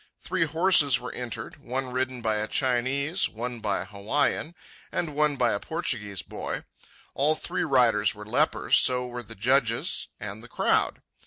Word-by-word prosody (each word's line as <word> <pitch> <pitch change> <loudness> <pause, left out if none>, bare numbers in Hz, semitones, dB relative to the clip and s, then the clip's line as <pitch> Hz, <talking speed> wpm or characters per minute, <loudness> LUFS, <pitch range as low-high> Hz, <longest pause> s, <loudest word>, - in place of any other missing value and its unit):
Three 185 -3 0
horses 155 -5 +4
were 125 - -6
entered, 120 -2 -6
one 130 +1 -4
ridden 130 -1 -2
by 110 -1 +1
a 105 0 -2
Chinese, 140 - +1
one 120 +2 -5
by 105 -2 -1
an - - -5
Hawaiian, 140 +10 -1 0.4
and 160 -4 -2
one 150 0 +2
by - - +2
a - - -1
Portuguese 100 -2 -3
boy. - - -5 0.5
All 150 +3 +2
three - - -2
riders 125 -7 +3
were 105 0 -9
lepers; 125 +9 +3
so 125 -1 +3
were 120 0 -6
the 115 0 -11
judges 130 +7 +1
and 105 +1 -6
the - - -11
crowd. - - +1
125 Hz, 165 wpm, -26 LUFS, 115-145 Hz, 0.5 s, horses